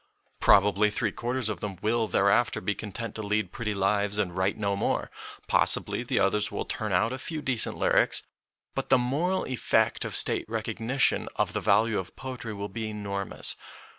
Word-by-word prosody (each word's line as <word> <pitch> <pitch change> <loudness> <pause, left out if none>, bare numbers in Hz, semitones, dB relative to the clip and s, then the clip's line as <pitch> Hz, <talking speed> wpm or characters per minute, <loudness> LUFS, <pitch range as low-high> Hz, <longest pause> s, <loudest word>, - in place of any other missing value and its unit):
Probably 105 +1 +5
three 110 0 -1
quarters 120 +3 -2
of 105 -5 -3
them 100 0 -5
will 110 +2 +1
thereafter 100 +4 +2
be 100 - -1
content 110 +2 -6
to 110 - -4
lead 105 -3 -1
pretty 110 -2 -3
lives 100 +1 +1
and 95 -4 -1
write 95 +2 0
no 100 -2 0
more; 100 - -1 0.4
possibly - - +2
the - - -2
others 105 +1 +2
will - - -3
turn 110 -2 -3
out 110 +7 +2
a 130 - -5
few 155 +4 -4
decent 130 -6 0
lyrics. - - +2 0.5
But - - -3
the 130 - +6
moral 150 +10 0
effect 130 -3 +1
of - - -2
State - - +2
recognition 115 +4 0
of - - 0
the - - -1
value 115 -1 +3
of 95 0 -8
poetry 125 -5 -6
will 100 0 -4
be 110 +2 -5
enormous. 100 -2 -1
105 Hz, 180 wpm, -27 LUFS, 100-120 Hz, 0.5 s, the